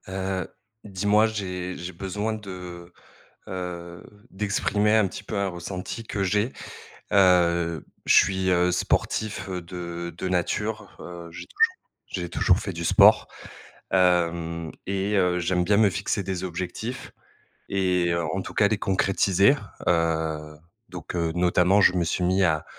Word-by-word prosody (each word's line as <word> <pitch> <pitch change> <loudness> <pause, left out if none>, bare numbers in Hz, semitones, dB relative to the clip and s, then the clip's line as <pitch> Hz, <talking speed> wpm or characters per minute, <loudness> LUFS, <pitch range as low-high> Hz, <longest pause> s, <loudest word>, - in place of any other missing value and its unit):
Heu, 95 -1 -3 0.4
dis-moi 105 +2 +2
j'ai 90 -4 -4
j'ai 90 +1 -6
besoin 105 +5 -3
de, 90 -4 -8 0.6
heu, 85 -2 -6 0.3
d'exprimer 105 +1 +1
un 110 -3 +4
petit 95 - -8
peu 105 - -4
un 100 0 +1
ressenti 90 +4 -6
que 100 -3 -3
j'ai. 105 +6 0 0.6
Heu, 85 -4 +3 0.2
je - - +5
suis 95 -1 +3
heu, 90 0 +3
sportif, 105 +4 -1
heu, 90 -1 -3
de 85 -1 -6
de 95 - -3
nature, 105 +4 -2
heu, 85 -1 -9
j'ai - - -8
toujours 460 0 +2 0.3
j'ai 90 -2 -4
toujours 90 - +3
fait 100 - -4
du 85 -1 -5
sport. - - +6 0.6
Hem, 85 -3 +1 0.2
et 100 +1 -1
heu, 90 -2 +2
j'aime 90 +1 +1
bien 100 +3 +3
me 105 -1 +5
fixer 100 +3 -2
des 95 -1 -4
objectifs 95 +7 -5 0.6
et 90 -3 +1
en 85 +2 -2
en - - -2
tout - - -8
cas 105 - +4
les 105 0 0
concrétiser. 95 +3 +3 0.3
Heu, 80 -3 0 0.3
donc, 90 -1 -7
heu, 85 -1 0
notamment 90 +2 +3
je 90 - +6
me 90 - +2
suis 85 +2 -1
mis 95 +2 +2
à 80 -3 +1
90 Hz, 150 wpm, -25 LUFS, 85-100 Hz, 0.6 s, sport